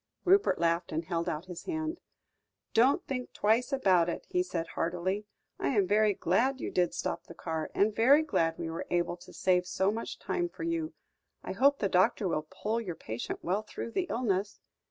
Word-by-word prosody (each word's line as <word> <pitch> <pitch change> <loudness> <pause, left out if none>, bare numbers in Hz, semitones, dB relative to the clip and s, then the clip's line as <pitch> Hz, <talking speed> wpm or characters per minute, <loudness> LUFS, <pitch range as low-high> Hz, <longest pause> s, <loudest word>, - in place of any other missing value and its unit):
Rupert 390 +3 +4
laughed 170 +1 +1
and 160 +1 -2
held 170 0 -1
out 160 +1 -4
his 180 -2 -8
hand. 320 -1 -3 0.7
"Don't 250 +5 +4
think 250 -2 -4
twice 225 +6 +2
about 185 -11 +3
it," - - -4
he 180 - +1
said 170 -2 -3
heartily. 180 +6 -2 0.3
"I - - 0
am 200 - +4
very 210 +1 +3
glad 245 +12 +1
you - - -4
did 175 -1 +1
stop 175 - -3
the - - -11
car, 160 -2 -3
and 210 +1 +2
very 275 +7 +6
glad 165 - +1
we 165 - -4
were 165 - -5
able 175 0 0
to - - -14
save 180 -1 +1
so 190 +2 +1
much 225 +2 -5
time 350 -1 -2
for - - -8
you. 330 -1 -2 0.5
I - - -5
hope 280 +1 +4
the 200 - 0
doctor 185 +2 +3
will 155 -3 -2
pull 215 +5 -2
your 180 -7 -5
patient 110 -4 -5
well 190 +4 0
through 215 +2 -7
the 360 +8 -1
illness." 200 -4 -1
195 Hz, 195 wpm, -30 LUFS, 175-250 Hz, 0.7 s, very